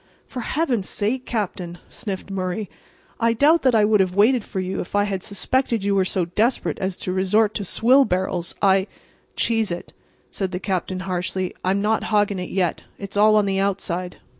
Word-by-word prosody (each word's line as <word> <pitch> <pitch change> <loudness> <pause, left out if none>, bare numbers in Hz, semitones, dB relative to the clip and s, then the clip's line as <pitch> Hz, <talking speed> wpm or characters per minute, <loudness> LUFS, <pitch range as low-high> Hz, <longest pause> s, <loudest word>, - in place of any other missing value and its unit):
"For 255 - -7
Heaven's 245 - -1
sake, 240 +5 -1
Captain," 185 -6 -3
sniffed 195 -1 -6
Murray, 185 +1 -3 0.5
"I 230 -1 +3
doubt 300 +8 +4
that 255 -3 +3
I 215 -1 +5
would 210 0 +3
have 185 -1 +1
waited 225 +4 +4
for 190 - -5
you 185 0 -3
if 180 - -7
I 205 - +4
had 195 -2 -2
suspected 225 +3 -1
you 200 0 +1
were 190 -1 +3
so 185 -1 0
desperate 220 +9 0
as 190 -1 -2
to 185 - -4
resort 205 +3 +2
to 205 - -3
swill 250 +8 +4
barrels. 180 -4 -1
I"— 195 0 +4 0.5
"Cheese 225 -2 +1
it," 175 0 -6 0.4
said 190 -2 -2
the 180 - -2
Captain, 185 -1 -2
harshly. 185 0 -2
"I'm 195 +2 +1
not 220 +1 +1
hogging 205 -2 +1
it 180 - -5
yet. 180 -3 0 0.2
It's 200 0 -7
all 215 +1 +5
on 210 -1 +4
the 195 -1 0
outside. 185 -2 -2
200 Hz, 190 wpm, -22 LUFS, 185-220 Hz, 0.5 s, I